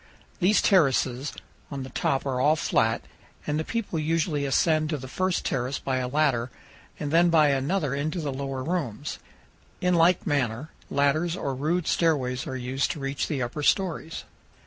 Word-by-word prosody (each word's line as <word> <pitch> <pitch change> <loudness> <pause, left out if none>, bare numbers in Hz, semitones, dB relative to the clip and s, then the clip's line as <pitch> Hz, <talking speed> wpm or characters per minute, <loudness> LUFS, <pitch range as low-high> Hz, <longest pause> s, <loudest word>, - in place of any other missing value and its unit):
These 195 +3 +3
terraces 135 - +2 0.4
on 140 -2 -5
the 130 - -9
top 135 +2 0
are 130 -2 -1
all 150 +3 +4
flat, 115 -7 +1 0.4
and 150 +1 -1
the - - -1
people 210 -4 -3
usually 155 -2 0
ascend 155 +2 +2
to 155 - -1
the 130 -1 -8
first 185 +6 -1
terrace 130 +2 -1
by 130 -1 -2
a 125 -1 -1
ladder 130 -4 +1 0.5
and 145 - -3
then 170 +2 +5
by 155 -3 +5
another 140 +2 0
into 155 +5 -2
the 145 -4 -3
lower 135 -1 -4
rooms. 145 - -3 0.6
In 180 0 +2
like 170 +1 +4
manner, 135 0 -1 0.2
ladders 155 +5 +1
or 140 -5 -2
rude 155 +6 -1
stairways 130 -7 +1
are 130 - -3
used 130 +2 -1
to 155 - -9
reach 135 0 -2
the 140 -5 -1
upper 120 +5 -4
stories. 165 0 0
145 Hz, 170 wpm, -26 LUFS, 130-165 Hz, 0.6 s, then